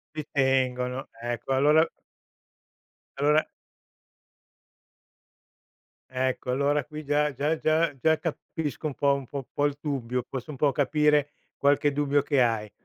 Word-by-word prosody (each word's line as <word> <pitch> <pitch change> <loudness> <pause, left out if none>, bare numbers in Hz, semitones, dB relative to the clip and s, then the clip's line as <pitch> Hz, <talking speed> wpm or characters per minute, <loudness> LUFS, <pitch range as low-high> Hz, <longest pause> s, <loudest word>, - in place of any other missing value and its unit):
Ci 155 -1 -4
tengono, 130 -1 0
ecco, 120 +2 -4
allora 150 +4 +5 1.3
allora. 150 +2 +3 2.6
Ecco 130 0 -1
allora 140 +2 +1
qui 150 +1 -8
già 145 0 +1
già 150 +4 0
già 160 +2 +2
già 160 +3 +3
capisco 160 -2 -5
un 150 - -4
po' 140 +1 +2
un 140 -1 -5
po' 140 - -7
un 135 - -4
po' 145 - 0
il 145 -1 -1
dubbio, 125 -4 -2
posso 135 +3 -6
un 140 - -9
po' 145 +1 +3
capire 150 +1 +2 0.3
qualche 145 +1 +3
dubbio 145 0 +1
che 140 -1 +1
hai. 110 -3 0
140 Hz, 135 wpm, -27 LUFS, 130-150 Hz, 2.6 s, allora